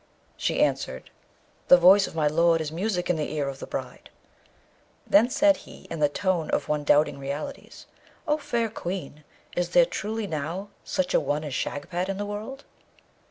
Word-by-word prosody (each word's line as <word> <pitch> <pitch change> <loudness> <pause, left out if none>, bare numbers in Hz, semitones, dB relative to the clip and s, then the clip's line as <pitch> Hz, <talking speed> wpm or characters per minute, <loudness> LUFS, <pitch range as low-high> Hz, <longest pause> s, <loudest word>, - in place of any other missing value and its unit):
She - - -1
answered, 65 - -2 0.6
'The 180 - +9
voice 190 +3 +6
of - - -11
my 155 -2 +1
lord 165 +2 +3
is 155 -1 -3
music 180 +1 -2
in 180 - +1
the 150 - -3
ear 145 -2 -1
of 135 -1 -5
the - - -7
bride.' - - -6 1.0
Then 220 +5 +5
said 295 +3 +4
he, - - -14
in 165 - -4
the 145 -1 +3
tone 180 0 -1
of - - 0
one 150 -1 -1
doubting 145 0 +3
realities, 140 +2 -6 0.4
'O 300 0 +2
fair 235 -5 -1
Queen, 175 -7 -6 0.3
is 175 - 0
there - - +8
truly 220 - -3
now 165 +4 -4
such 185 - -1
a - - +5
one 150 +1 -1
as 145 -3 -5
Shagpat 175 +8 -3
in 195 - -2
the 205 - -3
world?' 215 +7 -6
175 Hz, 180 wpm, -26 LUFS, 150-205 Hz, 1.0 s, The